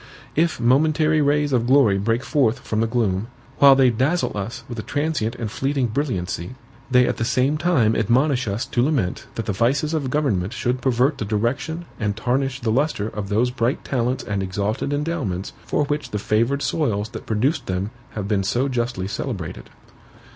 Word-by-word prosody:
If 165 -2 +1
momentary 155 +5 +3
rays 145 0 +2
of 120 -2 +2
glory 125 -7 +4
break 115 +4 0
forth 130 -5 +1
from 110 0 0
the 115 - +2
gloom, 110 -3 0 0.3
while 140 -1 +8
they 130 -2 +5
dazzle 140 +8 0
us 105 +3 -5
with 120 -2 -6
a - - -1
transient 145 -4 -1
and 115 -3 -4
fleeting 135 +1 0
brilliancy, 110 - -3 0.3
they 125 -1 +5
at - - -1
the - - -1
same 130 +5 +2
time 155 -9 +2
admonish 125 +3 +2
us 100 +4 -2
to 120 - 0
lament 125 - 0
that 115 - -3
the 105 - -1
vices 135 - +1
of 145 -5 -1
government 115 -9 0
should 125 +1 -1
pervert 130 +3 +2
the - - -1
direction 120 +11 -1
and 105 -1 -1
tarnish 135 +3 -1
the 115 -2 0
lustre 125 -4 0
of 105 -3 -5
those 115 +4 +2
bright 120 +1 -1
talents 125 0 -1
and 100 -2 -2
exalted 100 +8 -2
endowments 145 - -2
for 150 - +1
which 145 +1 -2
the 105 - -2
favored 115 +7 +1
soils 110 -9 0
that 110 -1 -9
produced 125 +9 0
them 95 +3 -2 0.2
have 105 -2 -3
been 100 -2 +1
so 125 +7 +1
justly 120 -7 -2
celebrated. - - -5
120 Hz, 185 wpm, -22 LUFS, 110-140 Hz, 0.3 s, while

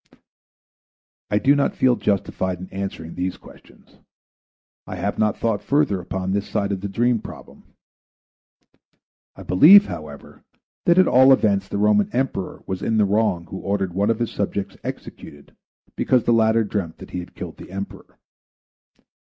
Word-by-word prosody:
I 105 - +1
do 135 +7 +3
not 140 - 0
feel 125 -1 +3
justified 95 -4 -2
in 95 - -8
answering 95 -4 -6
these 90 +1 -3
questions. - - -19 0.9
I - - -6
have - - -3
not 105 -1 +1
thought 115 -3 -1
further 140 -9 +1
upon 95 +1 -4
this 100 +1 -2
side 100 0 -1
of 95 -2 -3
the 100 - -4
dream 120 +4 +1
problem. - - -12 1.7
I - - -11
believe, 185 - +7
however, 75 - -10 0.4
that 170 0 +5
at 185 - +6
all 130 +1 +6
events 100 -6 +2
the 100 - -4
Roman 105 0 +3
Emperor 125 -7 -3
was 95 0 -4
in 110 - 0
the 105 - +4
wrong 100 -4 0
who 95 - -5
ordered 100 -2 -2
one 100 +3 0
of 115 - +1
his 120 0 -2
subjects 100 -1 -3
executed 70 0 -9 0.4
because 125 -3 +2
the 120 - +2
latter 110 0 +3
dreamt 100 -6 -4
that - - -12
he 90 - -4
had 90 - -10
killed - - -8
the - - -12
Emperor. 100 +2 -8
100 Hz, 160 wpm, -22 LUFS, 95-115 Hz, 1.7 s, believe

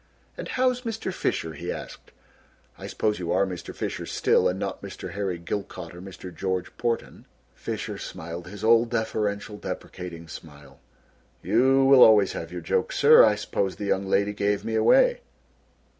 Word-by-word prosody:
"And - - -7
how's 255 -1 +1
Mr. 225 -5 -4
Fisher!" 80 - -2
he 85 +2 -5
asked; - - -8 0.7
"I - - -9
suppose 105 -2 -1
you 85 -1 -3
are 95 +2 +3
Mr. 90 -2 -6
Fisher - - -5
still - - +2
and 90 - -1
not - - -4
Mr. - - -8
Harry 100 -3 -2
Gilcott, 85 -1 -6
or 90 - -10
Mr. 95 -1 -10
George 95 +1 -3
Porten." 120 -1 -3 0.3
Fisher - - -5
smiled 85 +1 -7
his 100 +2 -9
old, 115 +1 +4
deferential, 105 -2 -2
deprecating 85 -4 -7
smile. 75 -2 -12 0.6
"You 130 +8 +3
will 135 -1 +7
always 105 -4 +7
have 80 0 -6
your 90 0 -6
joke, 80 - 0
sir. - - +7
I - - +5
suppose 95 -1 -2
the 105 - -5
young 95 -1 0
lady 100 +1 +1
gave 100 0 -1
me 115 - -3
away." 485 - +4
100 Hz, 165 wpm, -25 LUFS, 90-115 Hz, 0.7 s, will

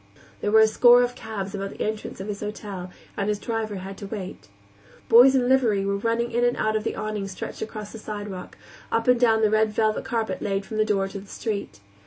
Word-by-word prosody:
There - - -1
were 220 +1 +6
a 220 - +7
score 245 +2 +6
of 245 0 -1
cabs 210 -5 -6
about 195 -1 -3
the - - -8
entrance 215 -2 -4
of 190 - -6
his 205 -1 -4
hotel, 205 -3 -6 0.3
and 200 +1 -1
his 210 - 0
driver 220 -1 -3
had 190 +1 -7
to 200 - -7
wait. 195 -3 -7 0.6
Boys 250 +4 +7
in 250 -2 +2
livery 235 -7 +3
were 200 0 0
running 230 +3 -1
in 240 +1 +1
and 245 0 +2
out 215 0 0
of 215 - 0
the - - -2
awning 210 -2 -3
stretched 190 -1 -7
across 215 -1 -6
the 225 - -9
sidewalk, 205 -3 -7 0.3
up 230 +1 0
and 250 -1 +5
down 225 -2 +4
the 215 - +3
red 215 0 +3
velvet 215 0 +1
carpet 225 -2 -2
laid 195 -1 -1
from 215 - -6
the 215 - +3
door 200 -2 +1
to 195 +1 -7
the 195 - -13
street. 200 - -5
215 Hz, 235 wpm, -25 LUFS, 200-225 Hz, 0.6 s, a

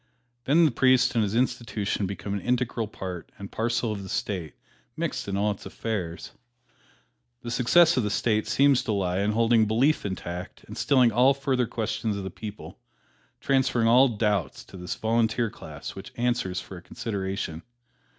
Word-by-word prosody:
Then 165 +5 +5
the 155 - +3
priest 130 +1 +4
and 115 -3 +2
his 105 +1 -2
institution 115 -5 -1
become 100 +1 -5
an 100 - -1
integral 120 -2 -1
part 90 -4 -7
and 100 0 -9
parcel 115 0 -1
of 100 -2 -4
the 95 - -8
State, 90 -6 -3 0.4
mixed - - -3
in 100 0 -2
all 105 +1 +2
its 100 - -7
affairs. 95 -6 -4 1.1
The 120 - -5
success 160 +8 +5
of - - +4
the 105 - 0
State 110 +1 +1
seems 140 -2 +4
to 110 - 0
lie 95 -2 0
in 105 +2 +1
holding 115 0 +3
belief 130 +8 +2
intact 90 -2 -6
and - - -10
stilling 130 -4 +4
all 125 +5 +4
further 135 -3 0
questions 110 -2 -2
of 100 - -5
the 95 - -5
people, 105 +3 -9 0.6
transferring 130 -4 +2
all 125 +4 +6
doubts 105 - -1
to - - -14
this 90 0 -4
Volunteer 115 0 +1
Class - - -9
which - - -9
answers 120 -7 0
for 95 - -9
a - - -10
consideration. 95 -4 -4
110 Hz, 170 wpm, -26 LUFS, 100-125 Hz, 1.1 s, all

